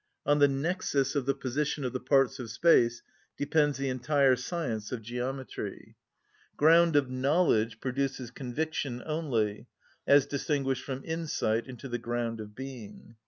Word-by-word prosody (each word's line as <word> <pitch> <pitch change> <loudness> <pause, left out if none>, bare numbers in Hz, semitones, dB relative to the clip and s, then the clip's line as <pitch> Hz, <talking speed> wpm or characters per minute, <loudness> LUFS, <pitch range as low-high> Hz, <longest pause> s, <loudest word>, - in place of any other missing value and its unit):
On 145 0 +3
the 145 - +7
nexus 140 -1 0
of 140 -2 -1
the 140 - +2
position 140 +2 -2
of 125 - -2
the 130 - -2
parts 135 0 +2
of 120 -3 -6
space 120 -8 +3 0.3
depends 145 -1 +2
the 135 0 -2
entire 130 +1 +3
science 120 -9 -4
of 120 -3 -4
geometry. 125 +3 -5 0.6
Ground 165 +1 +5
of 135 -3 +3
knowledge 130 -5 +2
produces 130 -1 -2
conviction 135 -1 -3
only, 130 -10 -1 0.4
as 140 -1 +6
distinguished 140 -2 -1
from 135 -1 -5
insight 155 -9 -1
into 130 +1 -8
the 120 -1 -3
ground 120 -1 -3
of 105 -1 -10
being. 120 -4 -9
135 Hz, 145 wpm, -29 LUFS, 120-145 Hz, 0.6 s, the